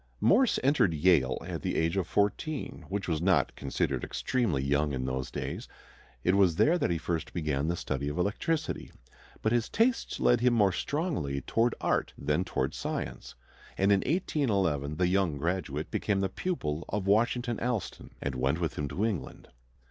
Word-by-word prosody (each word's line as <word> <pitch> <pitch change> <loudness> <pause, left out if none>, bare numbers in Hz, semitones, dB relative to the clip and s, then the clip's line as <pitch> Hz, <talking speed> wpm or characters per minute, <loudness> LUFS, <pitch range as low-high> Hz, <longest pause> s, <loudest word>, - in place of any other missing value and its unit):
Morse 245 +3 +4
entered 130 - +3
Yale 75 -6 +3
at - - -4
the - - -2
age 80 +2 +1
of 95 -3 0
fourteen, 105 +9 -1
which 100 0 -3
was 80 -3 0
not 85 -7 +2
considered - - -1
extremely 110 - 0
young 70 +1 +1
in 65 -1 -2
those 65 0 -2
days. - - -5 0.6
It 90 - +3
was 95 -5 +4
there 170 - +4
that - - +1
he 85 - +1
first 85 -1 -3
began 75 -3 -1
the 85 - 0
study 70 -3 -3
of 75 - -5
electricity. 150 - -1 0.5
But 110 - +2
his 120 -2 +1
tastes 230 +3 +1
led 120 -1 +4
him 125 -1 +4
more 100 -4 +4
strongly 90 - -2
toward 115 - +1
art - - 0
than 75 +5 0
toward - - -2
science, - - -5 0.4
and 100 +1 +3
in 100 - +5
1811 100 - 0
the 90 +3 +2
young 90 -5 +1
graduate 80 -1 -2
became 100 -2 0
the 95 - 0
pupil 80 - -2
of 100 -1 -2
Washington 120 +3 +2
Allston 120 -6 -3
and 70 - -1
went 65 +5 0
with 85 -3 -2
him 75 - -1
to 100 +9 -1
England. 95 -12 -4
95 Hz, 175 wpm, -29 LUFS, 75-115 Hz, 0.6 s, in